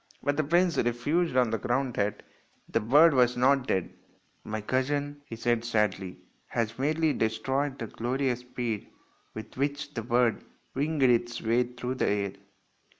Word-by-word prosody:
But 145 Hz, -, +1 dB
the 155 Hz, -, +1 dB
prince 175 Hz, +3 st, +2 dB
refused 130 Hz, +6 st, 0 dB
on 125 Hz, -3 st, +3 dB
the 115 Hz, -, -1 dB
ground 125 Hz, +3 st, 0 dB
that 100 Hz, -1 st, -1 dB, 0.4 s
the -, -, +1 dB
bird 145 Hz, +9 st, +6 dB
was 125 Hz, -2 st, +3 dB
not 130 Hz, +1 st, +3 dB
dead. 95 Hz, -2 st, -1 dB, 0.3 s
" -, -, -40 dB
My 110 Hz, 0 st, -4 dB
cousin," 145 Hz, +5 st, -1 dB
he 115 Hz, -, -7 dB
said 115 Hz, 0 st, 0 dB
sadly, 105 Hz, -5 st, -1 dB, 0.2 s
" -, -, -39 dB
has 115 Hz, +1 st, -2 dB
merely 155 Hz, +2 st, +1 dB
destroyed 135 Hz, +5 st, -1 dB
the 115 Hz, -, -4 dB
glorious 125 Hz, +3 st, -1 dB
speed 120 Hz, -3 st, -4 dB, 0.5 s
with 110 Hz, -, -8 dB
which 145 Hz, +1 st, -2 dB
the 115 Hz, -, -3 dB
bird 120 Hz, 0 st, +1 dB, 0.3 s
winged 145 Hz, +1 st, 0 dB
its 120 Hz, -1 st, +2 dB
way 115 Hz, +2 st, +2 dB
through 125 Hz, +1 st, -5 dB
the 130 Hz, -, 0 dB
air." 100 Hz, -1 st, 0 dB
125 Hz, 165 wpm, -28 LUFS, 115-140 Hz, 0.5 s, bird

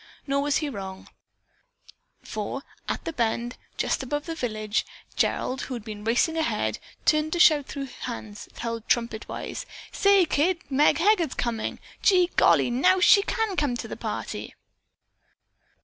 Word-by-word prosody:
Nor 280 Hz, 0 st, +1 dB
was 290 Hz, 0 st, +2 dB
he 305 Hz, -, -1 dB
wrong, 190 Hz, -7 st, -7 dB, 1.1 s
for, 220 Hz, +6 st, -4 dB, 0.3 s
at -, -, -3 dB
the 330 Hz, -, -3 dB
bend, 235 Hz, 0 st, -1 dB, 0.2 s
just -, -, 0 dB
above 290 Hz, +3 st, -3 dB
the 330 Hz, -, -4 dB
village, 215 Hz, -7 st, -1 dB, 0.3 s
Gerald, 255 Hz, 0 st, 0 dB
who 260 Hz, -, -4 dB
had 230 Hz, -3 st, -8 dB
been 210 Hz, -2 st, -7 dB
racing 240 Hz, +9 st, +2 dB
ahead, 320 Hz, -, 0 dB, 0.3 s
turned 305 Hz, 0 st, +3 dB
to 345 Hz, -, -1 dB
shout 300 Hz, -5 st, +6 dB
through 280 Hz, -1 st, -5 dB
hands 225 Hz, -5 st, -7 dB
held 230 Hz, -1 st, -4 dB
trumpet 230 Hz, -2 st, 0 dB
wise: -, -, -5 dB, 0.2 s
"Say 400 Hz, -2 st, +4 dB
kids, 340 Hz, +3 st, +1 dB
Meg 285 Hz, +3 st, +4 dB
Heger's 345 Hz, -5 st, +2 dB
coming. 230 Hz, -2 st, -2 dB, 0.2 s
Gee 360 Hz, -2 st, +4 dB
golly! -, -, +4 dB
Now 365 Hz, +10 st, +4 dB
she 400 Hz, +2 st, +7 dB
can 440 Hz, -1 st, -1 dB
come 285 Hz, -7 st, 0 dB
to -, -, -6 dB
the -, -, -6 dB
party!" -, -, -5 dB
275 Hz, 150 wpm, -26 LUFS, 230-330 Hz, 1.1 s, she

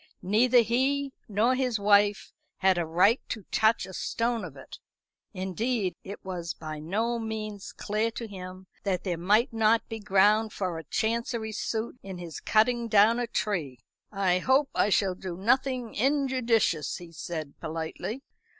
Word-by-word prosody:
Neither 235 Hz, +6 st, +5 dB
he 265 Hz, +4 st, 0 dB, 0.2 s
nor 215 Hz, +5 st, +3 dB
his 255 Hz, -3 st, 0 dB
wife 205 Hz, 0 st, +3 dB, 0.2 s
had 190 Hz, -2 st, +3 dB
a 170 Hz, -, -1 dB
right 185 Hz, +9 st, +4 dB
to 215 Hz, -4 st, -5 dB
touch 220 Hz, -2 st, +3 dB
a 190 Hz, -, -10 dB
stone 230 Hz, +3 st, -1 dB
of 155 Hz, -6 st, -8 dB
it. 135 Hz, -, -11 dB, 0.5 s
Indeed, 190 Hz, +2 st, -2 dB
it 200 Hz, +1 st, -9 dB
was 175 Hz, -3 st, -4 dB
by 155 Hz, -1 st, -7 dB
no 220 Hz, +9 st, -1 dB
means 215 Hz, -2 st, -5 dB
clear 215 Hz, +2 st, -1 dB
to 230 Hz, +1 st, -6 dB
him 185 Hz, -2 st, -9 dB, 0.2 s
that 190 Hz, -3 st, -1 dB
there 180 Hz, -3 st, -1 dB
might 210 Hz, +8 st, +3 dB
not 225 Hz, 0 st, +3 dB
be 225 Hz, -1 st, -5 dB
ground 210 Hz, +2 st, +3 dB
for 180 Hz, -4 st, -3 dB
a 160 Hz, -, -10 dB
Chancery 230 Hz, 0 st, -1 dB
suit 225 Hz, +3 st, -3 dB
in 190 Hz, -2 st, -7 dB
his 170 Hz, -3 st, -7 dB
cutting 235 Hz, +2 st, +2 dB
down 215 Hz, +2 st, +5 dB
a 245 Hz, -, -1 dB
tree. 170 Hz, -, -2 dB, 0.3 s
"I 190 Hz, -3 st, +1 dB
hope 265 Hz, +7 st, +2 dB
I -, -, +2 dB
shall 195 Hz, -2 st, +2 dB
do 180 Hz, -1 st, -7 dB
nothing 250 Hz, +3 st, +1 dB
injudicious," 250 Hz, -, +1 dB
he 175 Hz, -1 st, -11 dB
said 160 Hz, -2 st, -6 dB
politely. 165 Hz, -, -5 dB
210 Hz, 160 wpm, -28 LUFS, 185-235 Hz, 0.5 s, Neither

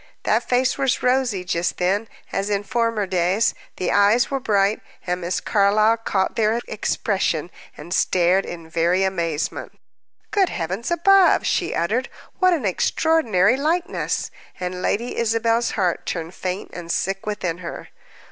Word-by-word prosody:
That -, -, +2 dB
face 255 Hz, +2 st, +1 dB
was 270 Hz, -2 st, +1 dB
rosy 250 Hz, -7 st, +1 dB
just 175 Hz, -1 st, -1 dB
then, 195 Hz, +5 st, 0 dB, 0.2 s
as 195 Hz, +1 st, -2 dB
in 200 Hz, -1 st, 0 dB
former 230 Hz, -2 st, 0 dB
days, 185 Hz, +3 st, +1 dB, 0.2 s
the 185 Hz, -, -1 dB
eyes 205 Hz, +6 st, +4 dB
were 275 Hz, -, 0 dB
bright, 205 Hz, -3 st, +1 dB, 0.2 s
and 180 Hz, 0 st, -2 dB
Miss 175 Hz, +1 st, -1 dB
Carlyle 215 Hz, +2 st, +3 dB
caught 195 Hz, -4 st, -1 dB
their 225 Hz, +1 st, +2 dB
expression, 190 Hz, -6 st, -1 dB, 0.3 s
and 170 Hz, +4 st, -7 dB
stared 185 Hz, +1 st, +3 dB
in 165 Hz, -2 st, -8 dB
very 170 Hz, +3 st, +1 dB
amazement. 170 Hz, -5 st, -2 dB, 0.5 s
"Good 390 Hz, -3 st, +2 dB
heavens 185 Hz, +8 st, -3 dB
above," 370 Hz, +3 st, +4 dB
she 355 Hz, -, 0 dB
uttered, 220 Hz, +10 st, 0 dB, 0.3 s
"what 370 Hz, -1 st, +5 dB
an 315 Hz, -10 st, 0 dB
extraordinary 235 Hz, -, +2 dB
likeness!" 345 Hz, +7 st, -1 dB, 0.3 s
And 180 Hz, 0 st, -4 dB
Lady 235 Hz, +6 st, -1 dB
Isabel's 230 Hz, +1 st, +1 dB
heart 180 Hz, -4 st, 0 dB
turned 165 Hz, 0 st, -4 dB
faint 185 Hz, +1 st, -4 dB
and 170 Hz, -1 st, -6 dB
sick 195 Hz, +3 st, -2 dB
within 180 Hz, -5 st, -2 dB
her. 170 Hz, -2 st, -8 dB
200 Hz, 145 wpm, -22 LUFS, 180-235 Hz, 0.5 s, what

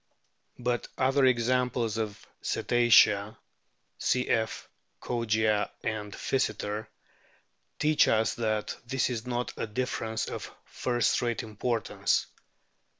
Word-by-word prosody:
\But 120 Hz, 0 st, -1 dB
other 135 Hz, +1 st, +3 dB
examples 125 Hz, -2 st, +1 dB
among 105 Hz, -2 st, -2 dB
the -, -, -20 dB, 0.2 s
Cetacea 110 Hz, -4 st, +4 dB, 0.6 s
(cf. 115 Hz, -3 st, 0 dB, 0.3 s
Kogia 110 Hz, -3 st, +1 dB
and 105 Hz, -2 st, -3 dB
Physeter) 105 Hz, -4 st, -2 dB, 0.9 s
teach 150 Hz, 0 st, +4 dB
us 110 Hz, 0 st, +2 dB
that 110 Hz, -2 st, -1 dB
this 130 Hz, 0 st, 0 dB
is 120 Hz, 0 st, -4 dB
not 120 Hz, 0 st, -2 dB
a -, -, -2 dB
difference 110 Hz, -1 st, -2 dB
of -, -, -6 dB
first 120 Hz, -2 st, 0 dB
rate 120 Hz, -2 st, -1 dB
importance. 110 Hz, 0 st, 0 dB
115 Hz, 100 wpm, -29 LUFS, 110-125 Hz, 0.9 s, Cetacea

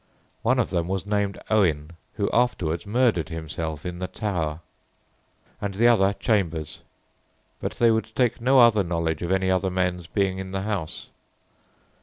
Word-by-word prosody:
One 125 Hz, +3 st, +2 dB
of 125 Hz, -, 0 dB
them 85 Hz, -2 st, 0 dB
was 95 Hz, 0 st, -2 dB
named 100 Hz, -1 st, -1 dB
Owen, 80 Hz, -8 st, +2 dB, 0.2 s
who 100 Hz, -3 st, 0 dB
afterwards 95 Hz, -8 st, 0 dB
murdered 110 Hz, -7 st, +2 dB
himself 80 Hz, -1 st, -5 dB
in 90 Hz, -1 st, -5 dB
the 90 Hz, -, -3 dB
Tower; 85 Hz, -8 st, -3 dB, 1.0 s
and 100 Hz, -1 st, -3 dB
the 115 Hz, +4 st, +4 dB
other 100 Hz, -4 st, +4 dB
Chambers; 85 Hz, -, -1 dB, 0.8 s
but -, -, -3 dB
they 115 Hz, -1 st, +3 dB
would 110 Hz, 0 st, -1 dB
take 120 Hz, -2 st, +1 dB
no 130 Hz, +2 st, +5 dB
other 115 Hz, -3 st, +6 dB
knowledge 85 Hz, -3 st, -1 dB
of 85 Hz, -, -3 dB
any 95 Hz, 0 st, +2 dB
other 95 Hz, +1 st, +1 dB
men's 90 Hz, -2 st, -1 dB
being 95 Hz, +1 st, 0 dB
in 95 Hz, 0 st, -6 dB
the 95 Hz, 0 st, -2 dB
house. 100 Hz, -7 st, -4 dB
95 Hz, 160 wpm, -25 LUFS, 85-110 Hz, 1.0 s, other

